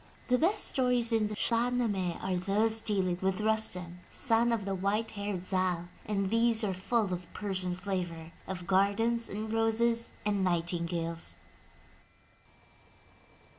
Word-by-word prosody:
The 250 0 +4
best 355 +7 +4
stories 250 -2 +2
in 220 -2 +2
the 210 - -5
Shah 235 +2 +1
Nameh 205 -8 -1
are 190 -1 0
those 210 +5 +1
dealing 190 -5 0
with 190 0 0
Rustem, 200 -5 0
son 235 -2 +4
of 225 -4 -1
the 195 - -2
white 200 +4 -1
haired 200 -3 -4
Zal, 185 -2 -1 0.2
and 195 -2 -1
these 230 0 +4
are 200 -2 0
full 195 +1 0
of 180 0 -6
Persian 185 -3 -2
flavor 175 -4 -4
— - - -26
of 180 -2 -5
gardens 205 +5 +1
and 215 +2 -4
roses 230 +1 +1
and 205 -2 +1
nightingales. 170 - -2
200 Hz, 140 wpm, -30 LUFS, 180-225 Hz, 0.2 s, The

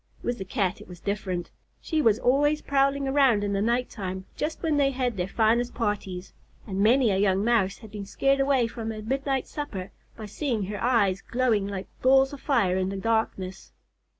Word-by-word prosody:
With 240 -2 -2
the 190 - -4
Cat 190 -3 -1
it - - -12
was 180 -1 -11
different. 185 -4 -3 0.3
She 315 -2 -1
was 225 -6 +4
always 290 +5 +2
prowling 275 0 +1
around 270 -6 +3
in 200 0 -1
the 195 - 0
night 240 +3 +1
time, 190 -3 -5
just 310 +3 -4
when 315 -3 +1
they 280 -1 +4
had 250 -3 -1
their 180 -1 -2
finest 230 +4 +1
parties; 195 -5 -3 0.3
and 195 -3 -4
many 235 +2 +4
a 190 - +1
young 195 0 +2
Mouse 220 -5 +2
had 220 -3 -13
been 200 -1 -7
scared 275 +6 +1
away 270 -3 +3
from 225 -1 -5
a 215 -1 -7
midnight 270 +2 -1
supper 200 -11 -6 0.3
by 220 - -7
seeing 225 0 -2
her 205 +1 -5
eyes 205 -6 +2
glowing 235 -5 0
like 195 -1 -5 0.2
balls 270 +1 +4
of 280 - -9
fire 210 -10 +2
in 190 0 0
the 195 - -4
darkness. 195 -3 -2
225 Hz, 200 wpm, -26 LUFS, 195-270 Hz, 0.3 s, was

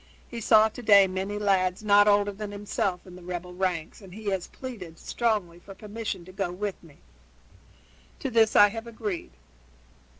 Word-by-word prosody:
He 235 -1 -7
saw 220 0 +6
to 220 +3 -9
day 200 -4 +7
many 190 +2 -3
lads 190 -2 +1
not 205 0 +5
older 205 0 +3
than 205 +1 -7
himself 200 -3 -3
in 180 -1 -12
the 180 - -12
rebel 180 0 -6
ranks, 180 -1 -3
and 190 -2 -12
he 215 -2 -3
has 190 -2 -2
pleaded 200 -11 -9
strongly 205 -8 -1
for 195 +2 -12
permission 210 -3 -6
to 185 - -12
go 190 -1 -3
with 200 +2 -4
me. 160 -4 -18 1.2
To - - -4
this 225 -1 +3
I 205 0 +8
have 225 +2 -7
agreed. 215 - -5
200 Hz, 175 wpm, -27 LUFS, 180-215 Hz, 1.2 s, I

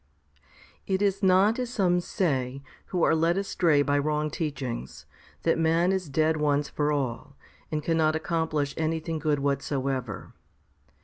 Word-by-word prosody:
3. 190 - +1
It 190 - -2
is 200 0 +1
not 195 +4 +4
as 250 -2 -2
some 185 -7 +2
say, 140 -7 -1 0.2
who 180 -2 -1
are - - +4
led 165 +3 +2
astray 170 -6 +2
by 145 0 +1
wrong 150 +1 -1
teachings, 135 - -5 0.4
that 165 0 +2
man 165 +3 +3
is 185 -5 -2
dead 155 +3 +2
once 145 -1 +1
for 150 0 -1
all, 140 0 -3 0.4
and 155 -1 -2
cannot 160 -1 +2
accom 160 0 -1
plish 145 -2 -1
anything 160 0 -2
good 150 -1 +1
whatsoever. 135 -5 -2
155 Hz, 150 wpm, -27 LUFS, 145-175 Hz, 0.4 s, not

